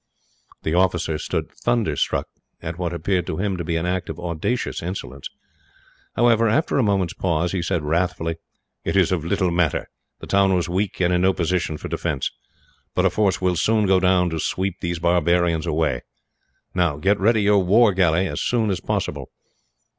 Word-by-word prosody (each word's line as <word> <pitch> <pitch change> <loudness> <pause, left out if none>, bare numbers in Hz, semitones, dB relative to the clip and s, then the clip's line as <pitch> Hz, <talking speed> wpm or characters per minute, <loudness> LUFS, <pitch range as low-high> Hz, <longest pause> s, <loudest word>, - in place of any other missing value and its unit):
The 80 - -1
officer 85 -3 +1
stood - - -3
thunderstruck 115 - 0 0.3
at 85 +2 -6
what 85 -2 -1
appeared, 85 +1 -1
to 80 - -3
him, 100 0 -1
to 85 - -3
be 85 +1 -2
an 80 +1 -1
act 90 0 -2
of 80 +1 -6
audacious 85 +8 -2
insolence. 70 -7 -6 0.9
However, 115 -1 +4
after 140 +4 +1
a - - +3
moment's 95 -5 +1
pause, 85 -2 0
he 95 - -1
said 85 -2 -1
wrathfully: 80 +1 -1 0.5
"It - - -2
is 95 -3 +3
of 90 -4 0
little 90 +1 0
matter. 85 -3 0 0.3
The - - -9
town 95 -1 +3
was 90 -1 0
weak, 95 +3 -2
and 90 0 +3
in 90 - +2
no 95 +1 +3
position 85 -2 -1
for - - -7
defence; 75 -6 -2 0.6
but 90 - +2
a 95 - +3
force 100 -1 +1
will 90 -1 +1
soon 105 +5 +2
go 95 -1 +4
down 90 -1 +2
to 80 - -2
sweep 95 +3 -2
these 85 0 -2
barbarians 85 -1 +2
away. 80 -5 0 0.7
Now, 85 -5 +1
get 100 +7 +1
ready 110 +2 +3
your 100 -1 +4
war 105 +3 +5
galley, 90 -1 +2
as - - -3
soon 115 -4 +1
as 95 - -1
possible." - - -3
90 Hz, 185 wpm, -22 LUFS, 85-95 Hz, 0.9 s, war